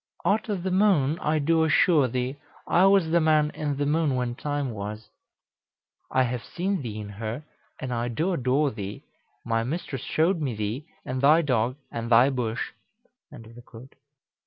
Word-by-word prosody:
"Steph. - - +2
Out 220 +2 -1
o' 205 - 0
th' 185 +1 -2
moon, 180 -6 +3
I 155 +1 0
do 160 +2 +2
assure 160 -2 +4
thee. 125 +3 -3 0.3
I 185 +3 +4
was 195 -5 +3
the 170 0 +4
man 155 -1 +3
in 145 -2 -3
th' 145 - 0
moon 150 -2 +1
when 125 -1 -1
time 145 0 -3
was. 105 0 -7 1.0
"Cal. 130 - +3
I - - +5
have 125 -1 -3
seen 185 0 -2
thee 110 -4 -5
in 105 - -6
her; 110 +7 -5 0.4
and 130 -1 -4
I 120 0 -1
do 160 +11 -1
adore 135 0 +1
thee. 100 -2 -7 0.4
My 115 0 0
mistress 135 0 -4
showed 165 +2 +1
me 130 -6 -2
thee, 110 +8 -4 0.2
and 130 0 -3
thy 155 +4 +5
dog, 125 -3 +1 0.2
and 115 0 -4
thy 125 +4 +6
bush." 120 -3 -2
140 Hz, 175 wpm, -26 LUFS, 120-160 Hz, 1.0 s, thy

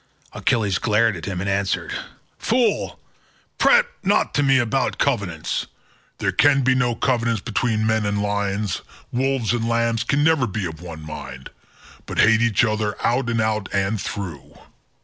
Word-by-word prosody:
Achilles 105 -7 0
glared 110 0 +2
at 80 -3 -7
him 95 -2 -3
and 100 - -3
answered, 100 -1 -1 0.5
"Fool, 245 +1 0 0.6
prate 485 0 +5 0.2
not 205 +2 +2
to 145 - +2
me 135 -1 +4
about 120 -4 0
covenants. 85 -6 -1 0.5
There - - 0
can 140 -2 +4
be 130 +1 +4
no 125 -2 +1
covenants 115 -3 0
between 110 -1 -1
men 110 0 +1
and 105 0 -1
lions, 100 -1 -1 0.3
wolves 130 -3 0
and 115 -1 -1
lambs 115 0 +1
can 140 +5 +1
never 160 -5 +3
be 100 -1 -3
of 80 -1 -7
one 80 -3 -8
mind, 75 -4 -8 0.6
but - - -6
hate 110 +1 +5
each 115 -1 +3
other 110 -2 -1
out 120 +1 +1
and 115 0 0
out 110 -2 -1
all 100 +2 +1
through. 90 -7 -6
110 Hz, 160 wpm, -22 LUFS, 100-120 Hz, 0.6 s, prate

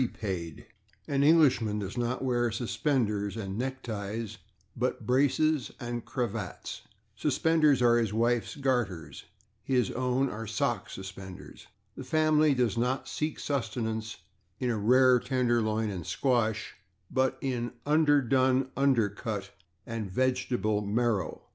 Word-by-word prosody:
[Pg104] 95 -9 -4 0.4
An 140 -1 +1
Englishman 140 -9 +4
does 100 -2 -4
not 120 +1 -1
wear 120 -2 +1
/suspenders/ 110 -3 -1
and 100 +1 -3
/neckties/, 110 -4 -4 0.4
but - - -2
/braces/ 140 +2 +2
and 120 -2 -4
/cravats/. 115 -5 -4 0.3
/Suspenders/ 150 0 +3
are 120 0 +5
his 115 -4 0
wife's 115 +2 +1
garters; 120 - -2 0.4
his 125 -4 +1
own 130 +2 0
are 115 -2 -5
/sock 105 -1 -1
suspenders/. 95 -1 -9 0.3
The - - -7
family 155 +1 +3
does 120 -3 +1
not 125 +3 0
seek 155 0 -3
sustenance 110 -4 -3 0.4
in 125 -1 0
a - - 0
/rare 125 +3 +5
tenderloin/ 115 -4 +1
and 90 -4 -5
/squash/, 115 - 0 0.4
but 130 0 +1
in 125 -3 -2
/underdone 135 -4 +3
under 135 -6 +3
cut/ 100 -1 -5 0.3
and 115 -3 -4
/vegetable 125 -3 0
marrow 105 -2 -1
120 Hz, 120 wpm, -29 LUFS, 110-130 Hz, 0.4 s, are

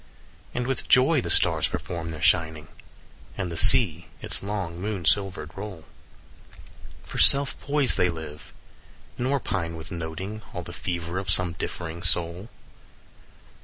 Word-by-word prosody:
20 - - -8
"And 125 - -1
with 130 -1 -2
joy 130 +3 +4
the - - -6
stars - - +5
perform 85 +1 -5
their 80 -2 -7
shining, 80 -2 +1 0.7
And 95 -3 -4
the - - -5
sea - - +4
its - - -3
long 95 -4 -5
moon 100 -4 -4
silver'd 95 +3 0
roll; 95 -5 -8 1.2
For - - -7
self 140 0 +6
poised 145 -2 +3
they 90 - +3
live, 80 -3 -9 0.7
nor 135 +3 0
pine 85 -8 -4
with 80 0 -9
noting 85 +6 -6
All 90 - -5
the 85 - -10
fever 85 0 -4
of 95 -1 -7
some 90 -1 +2
differing 85 -1 -6
soul. 85 +3 0
90 Hz, 145 wpm, -25 LUFS, 85-105 Hz, 1.2 s, self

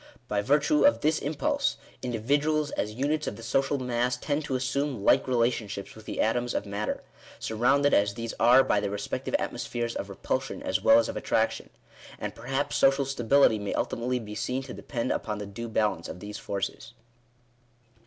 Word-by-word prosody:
By 105 -2 0
virtue 150 - +3
of 290 - +5
this 155 +1 +2
impulse, 280 - 0 0.2
indi 125 -2 -2
viduals, 145 +5 +1
as 105 0 -2
units 150 +4 0
of - - -3
the 115 - -11
social 135 +4 +1
mass, 125 -1 0
tend 145 +4 -1
to 135 - -2
assume 130 -2 -1
like - - +4
relation 120 -3 +1
ships 100 -1 -7
with 110 -1 -14
the - - -5
atoms 120 +2 0
of - - -1
matter, 100 +1 -3 0.3
surrounded 135 +6 +2
as 100 0 +3
these 115 -1 -4
are 125 +3 +7
by 105 - +2
their 100 0 -2
respective 100 0 -3
atmospheres 120 0 -3
of 100 - -4
repulsion 130 - -3
as 280 -1 0
well 280 - +7
as 290 - +3
of - - -4
attraction. - - 0 0.5
And - - -4
perhaps 135 +2 -2
social 135 0 +4
stability 135 -3 +3
may 100 -1 -3
ultimately 125 +2 -1
be 105 -3 -7
seen 125 +5 -2
to 130 - -8
depend 120 -4 -3
upon 105 -1 -2
the 105 - -5
due 115 +4 -6
balance 105 -6 0
of - - -7
these 105 +2 -7
forces. 100 +2 -4
120 Hz, 185 wpm, -28 LUFS, 110-140 Hz, 0.5 s, are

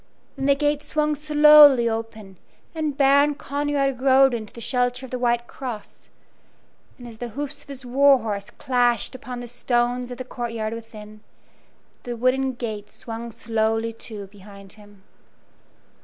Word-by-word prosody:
Then 270 0 -2
the 280 - +5
gate 295 0 0
swung 300 0 -1
slowly 300 -4 +7
open, 225 -4 -5 0.3
and 310 -3 -3
Baron 280 +1 +4
Conrad 280 -2 -2
rode 270 -1 +5
into 220 -3 -5
the - - -12
shelter 250 +1 -1
of 260 - -13
the 250 - -3
White 240 -1 +1
Cross, 240 -4 -9 0.9
and 245 - -11
as 225 -2 -11
the 240 - -5
hoofs 285 +5 -6
of - - -16
his 265 -2 -9
war 275 +2 +5
horse 210 -3 -5
clashed 245 -1 0
upon 250 -1 -7
the 245 - -7
stones 245 +1 -1
of 245 - -7
the 255 - -5
courtyard 230 -3 -4
within, 215 -2 -10 0.8
the 240 -1 -6
wooden 260 +2 +1
gate 215 -4 -6
swung 230 +1 -8
slowly 225 0 -1
to 215 -2 -8
behind 200 0 -14
him. 205 -2 -18
245 Hz, 155 wpm, -23 LUFS, 225-275 Hz, 0.9 s, slowly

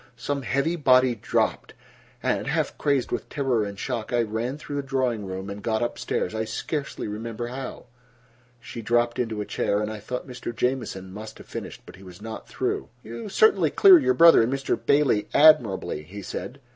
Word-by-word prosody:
Some 145 -1 -3
heavy 140 +7 0
body 130 -5 +4
dropped, 110 - -1 0.5
and, - - 0
half - - -1
crazed 140 -4 0
with - - -3
terror 130 -6 0
and 100 -1 -6
shock, 110 +3 -4
I 120 -1 +2
ran 115 +5 -3
through 145 -1 -6
the - - 0
drawing 130 -6 -1
room 95 +1 -5
and 100 0 -7
got 110 +1 0
up 120 - -3
stairs—I 110 +4 -2
scarcely 140 +6 -4
remember 115 +3 -5
how." 130 +1 -7 0.7
She 115 0 -8
dropped 120 +2 +1
into 110 -3 -2
a - - -4
chair, 100 - 0
and 105 0 -2
I 110 - -6
thought 125 +4 -5
Mr. 125 -2 -7
Jamieson 115 -8 -2
must 110 +2 -9
have - - -13
finished. - - -7
But - - -13
he 95 - -15
was 90 -2 -12
not 110 +1 -8
through. - - -2
"You 115 - -7
certainly 440 - +4
clear 380 -3 +8
your 130 - +2
brother 165 +1 +8
and 115 +3 +1
Mr. 135 0 0
Bailey 140 -7 +2
admirably," 125 - +4
he 95 +6 -10
said. 130 +8 -6
120 Hz, 190 wpm, -25 LUFS, 105-135 Hz, 0.7 s, clear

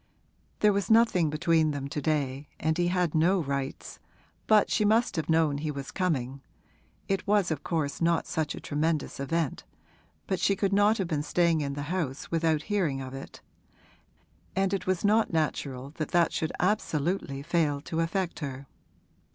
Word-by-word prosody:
There 210 -1 +5
was 200 0 -1
nothing 220 -8 +4
between 160 +1 +2
them 140 -2 -3
to 150 - -3
day 140 -2 -1
and 160 +1 +1
he 175 +1 +1
had 180 -3 +1
no 175 +5 +3
rights, 140 -3 -4 0.5
but 215 -1 +4
she - - +2
must 220 +2 +3
have 160 -2 -2
known 160 -3 +2
he 155 +1 -3
was 140 -2 -5
coming 140 -8 -1 0.7
(it 195 0 -1
was 205 -4 +3
of 150 -3 -3
course 155 -4 -2
not 170 -1 +2
such 155 -2 -2
a - - -7
tremendous 155 0 -1
event, 145 +1 -1 0.6
but 190 - -1
she 195 +2 +2
could 195 0 0
not 205 +2 +4
have 190 - -1
been 155 -4 -1
staying 165 0 +2
in 140 -1 -2
the 145 +1 -4
house 155 -7 -3
without 160 -2 +1
hearing 180 -10 0
of 130 -1 -7
it), 135 - -9 1.1
and 195 0 +1
it 190 -2 -2
was 185 +1 0
not 215 +2 +3
natural 140 -4 -2
that 155 - -3
that 175 -1 +2
should 160 - -1
absolutely 170 -7 -1
fail 155 -3 +1
to 160 +2 -4
affect 175 +2 -1
her. 140 -2 -5
160 Hz, 175 wpm, -28 LUFS, 145-185 Hz, 1.1 s, There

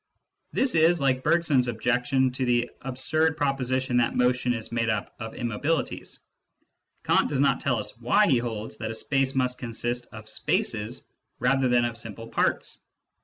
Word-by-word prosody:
This 260 -2 +1
is 165 +1 +4
like 130 -2 +1
Bergson's 145 -5 +3
objection 125 +3 +1
to 130 +1 -3
"the 120 -1 +1
absurd 155 +5 0
proposition 130 -2 0
that 120 -1 +2
motion 125 0 +2
is 115 -2 -3
made 115 -1 0
up 105 -2 -2
of 110 -1 -6
immobilities." 130 +6 -2 0.9
Kant - - +3
does 140 - -1
not 140 - +3
tell 135 -5 +1
us 105 - -4
why 200 - +4
he 130 -11 +3
holds 110 -2 -5
that 110 - -4
a 115 - -4
space 135 +2 0
must 125 -1 0
consist 120 0 -3
of 110 -1 -10
spaces 110 +1 -1 0.3
rather 130 +2 +2
than 120 -1 +3
of 115 -1 -3
simple 115 0 -7
parts. - - -1
125 Hz, 165 wpm, -26 LUFS, 115-135 Hz, 0.9 s, is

